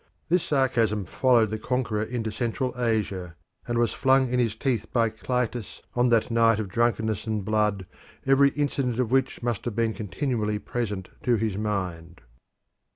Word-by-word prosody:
This 180 +1 +3
sarcasm 125 - +1
followed 115 +1 +3
the 110 - -3
conqueror 120 -3 -1
into 110 0 -3
Central 120 +3 -2
Asia, 105 -8 -1 0.3
and 120 -1 -1
was 120 0 +2
flung 130 -1 +3
in 125 - +2
his 115 -3 +1
teeth 110 -3 -1
by 115 -2 +2
Clitus 120 0 -3
on 120 0 +2
that 115 0 +2
night 115 -1 +4
of 105 -3 -3
drunkenness 110 0 0
and 105 -3 -2
blood, 105 -2 +1 0.4
every 135 +1 +5
incident 140 -4 -1
of 125 -2 0
which 135 -1 +1
must 120 -4 -1
have 120 -4 -3
been 115 -1 +1
continually 105 +1 -2
present 105 -4 -4
to 120 - +2
his 110 -3 -1
mind. 90 -6 -3
115 Hz, 160 wpm, -26 LUFS, 105-125 Hz, 0.4 s, every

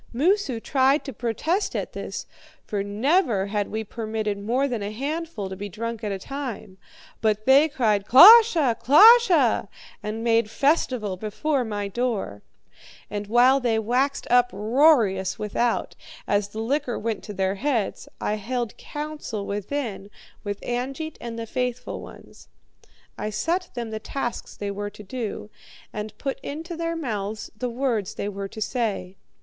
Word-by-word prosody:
Moosu 315 - +1
tried 270 +4 +2
to 270 - -6
protest 285 - -1
at - - -3
this, - - -5 0.4
for 205 -2 -2
never 220 - +1
had 205 0 -1
we 220 0 -3
permitted 215 -1 -3
more 245 +7 0
than 240 -5 -3
a 200 - -3
handful 280 - -4
to 190 - -6
be 205 +2 -6
drunk 230 +3 -5
at 210 - -2
a 195 - -2
time; 225 -5 -7 0.4
but 215 -1 +1
they 280 +4 +6
cried, 215 -7 +1
'KLOSHE! 345 - +8
KLOSHE!' 350 - +6 0.3
and 215 +2 -4
made 230 -2 +2
festival 250 - +1
before 255 +8 -1
my 205 -3 -3
door. 200 - -2 0.7
And 205 0 -4
while 245 +5 +5
they 235 -4 +1
waxed 250 +6 0
uproarious 230 -4 +3
without, 220 +3 -1 0.3
as 205 0 +1
the 215 +2 -6
liquor 260 +1 -1
went 225 0 -3
to 210 - -7
their 190 0 0
heads, 230 -1 -2
I 210 - -1
held 235 +1 -3
council 295 -9 -5
within 205 0 -4 0.3
with 205 -1 -4
Angeit 270 +6 -4
and 230 -1 -6
the 230 - -4
faithful 250 +1 -3
ones. - - -14 0.7
I 215 - -2
set 330 - -1
them 235 -2 -4
the 220 - -4
tasks 240 +1 -5
they 205 -1 -3
were 205 +1 -4
to 210 +1 -12
do, 215 0 -5 0.4
and 210 0 -6
put 275 +2 -3
into 325 +4 -6
their 335 0 -2
mouths 215 -8 -4
the 245 +3 -3
words 235 -5 -1
they - - -3
were 200 -1 -5
to 220 - -10
say. 205 -7 -3
230 Hz, 155 wpm, -24 LUFS, 210-275 Hz, 0.7 s, KLOSHE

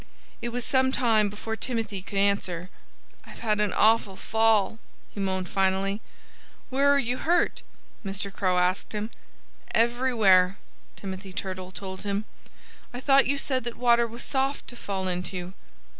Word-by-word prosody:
It 240 - -2
was 245 0 -4
some 260 -1 +3
time 225 -5 +3
before 220 +2 -5
Timothy 225 -5 -2
could 195 +2 -6
answer. 190 -3 +1 0.5
"I've - - -13
had 215 -2 +1
an 210 -2 +1
awful 215 -3 +4
fall," 220 0 +2 0.3
he - - -7
moaned 190 -1 -1
finally. 195 +2 0 0.7
"Where 275 +2 +3
are 285 - +5
you 250 -2 0
hurt?" 345 +5 +1 0.4
Mr. 195 0 -3
Crow 185 -2 +1
asked 180 +3 +1
him. 210 +2 -3 0.6
"Everywhere!" 225 -6 +4 0.4
Timothy 190 -1 -7
Turtle 185 -1 -5
told 190 0 -6
him. 205 +1 -2 0.7
"I 245 - -6
thought 275 +1 +4
you 280 +1 +1
said 265 -3 0
that 240 - -4
water 235 -1 +4
was 235 +1 -8
soft 270 +1 -1
to 245 - -8
fall 195 -4 -3
into." 180 0 -3
210 Hz, 150 wpm, -27 LUFS, 190-240 Hz, 0.7 s, are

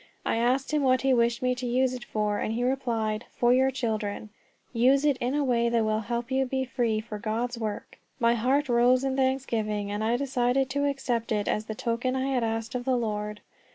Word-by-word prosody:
I - - +1
asked 255 +4 +1
him 300 - +2
what 255 -2 +3
he 270 -1 +3
wished 235 0 +1
me 250 0 +2
to 250 0 -5
use 255 +1 +1
it 250 -1 -6
for, 210 -1 -1
and 220 - -2
he 240 - -1
replied, 235 -4 -1
"For 240 0 +3
your 260 +1 +4
children. 215 -5 -3 0.4
Use 260 +4 +3
it 290 -2 +4
in 250 +3 -1
a 295 - +1
way 235 -3 +2
that 230 -1 +1
will 215 0 +1
help 235 +3 -4
you 265 0 +2
to 260 - -6
be 265 0 -1
free 235 -4 0
for 215 -1 -7
God's 230 +3 -2
work." 215 -2 -5 0.2
My 235 0 +4
heart 260 +5 +1
rose 245 +1 +4
in 265 -1 0
thanksgiving, 230 -6 -1
and 205 +1 -2
I 230 +2 +1
decided 260 0 0
to 285 +1 +1
accept 245 -5 -2
it 210 -1 0
as 215 - 0
the 220 - -5
token 245 +3 -1
I 265 +1 -1
had 250 -2 +1
asked 225 +1 -2
of 250 -1 -3
the 255 0 +1
Lord. 210 -2 -3
240 Hz, 225 wpm, -27 LUFS, 220-260 Hz, 0.4 s, your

